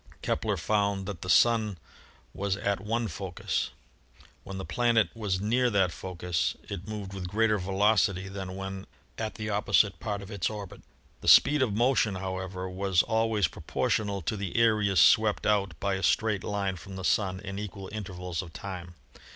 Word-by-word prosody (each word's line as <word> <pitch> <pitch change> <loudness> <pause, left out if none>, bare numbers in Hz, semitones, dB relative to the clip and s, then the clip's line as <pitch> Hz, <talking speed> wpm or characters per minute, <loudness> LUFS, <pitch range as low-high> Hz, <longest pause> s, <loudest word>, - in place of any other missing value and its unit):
Kepler 105 -3 0
found 100 +2 0
that 95 -4 -6
the 90 - -6
Sun 110 -1 +4 0.6
was 100 0 -1
78 - - -2
ASTRONOMY 100 0 0
at 105 - -9
one 115 0 0
focus. 95 0 -3 0.7
When 95 - -7
the 95 - -5
planet 120 -2 +2
was 105 -5 -1
near 120 +5 +2
that 95 -5 +2
focus, 90 -2 -2
it 95 -2 -7
moved 105 -3 -6
with 95 -2 -5
greater 105 +2 +2
velocity 95 0 +2
than 95 -1 -6
when 95 0 -6 0.3
at 110 -1 -3
the 105 -1 -4
opposite 100 -3 +2
part 100 -2 -3
of 100 - -10
its 100 -5 -1
orbit. 105 -3 -8 0.4
The - - -9
speed 150 -1 +7
of 110 -6 +1
motion, 120 -3 +2
however, 95 0 -4
was 95 -1 +1
al 115 0 +2
ways 105 -5 +2
proportional 100 +1 -1
to 110 - -1
the 100 0 -4
areas 105 -5 +3
swept 105 +5 +5
out 100 -2 +1
by 100 -1 0
a 95 - -2
straight 100 +3 +1
line 100 -2 -2
from 95 +4 -10
the 95 -1 -5
Sun 95 -2 +1
in 100 0 -6
equal 100 -2 -6
intervals 90 -5 -4
of 85 -4 -11
time. 90 -1 -7
100 Hz, 180 wpm, -28 LUFS, 95-105 Hz, 0.7 s, speed